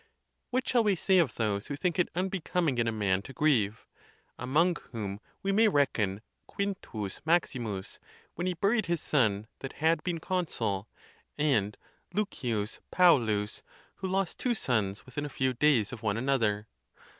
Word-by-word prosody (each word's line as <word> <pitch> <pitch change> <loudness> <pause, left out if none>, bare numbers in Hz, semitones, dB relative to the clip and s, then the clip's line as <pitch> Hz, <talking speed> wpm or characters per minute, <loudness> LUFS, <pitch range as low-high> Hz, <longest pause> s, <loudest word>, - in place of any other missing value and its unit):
What 255 +1 -1
shall 240 -2 +3
we 205 -2 +3
say 190 +2 +3
of 165 -6 +2
those 105 -3 -1
who 145 - -3
think 175 +5 -1
it 180 - +3
unbecoming 180 -6 0
in 115 - +2
a - - +2
man 100 -3 +1
to 135 - -10
grieve? 115 -9 +1 0.5
among 160 +8 +2
whom 100 -4 -4 0.2
we 195 - +1
may 220 +3 +5
reckon 110 - +1 0.4
Q. 195 - -2 0.2
Maximus, 120 - -1 0.3
when 175 +2 -3
he 180 - 0
buried 200 +3 +1
his 170 -1 +1
son 110 -10 +1
that 135 - -6
had 160 0 +1
been 175 -2 -1
consul, 120 - -1 0.5
and 120 -9 +1 0.4
L. 210 -1 +2 0.6
Pau 180 -2 +7
lus, 105 -5 -1 0.4
who 190 - -3
lost 190 -1 -1
two 245 -2 +1
sons 105 - -1
within 130 +3 -5
a 145 - -4
few 130 -1 0
days 125 -4 +3
of 115 - -7
one 105 -2 0
another. 115 -5 +1
140 Hz, 160 wpm, -30 LUFS, 110-180 Hz, 0.6 s, Pau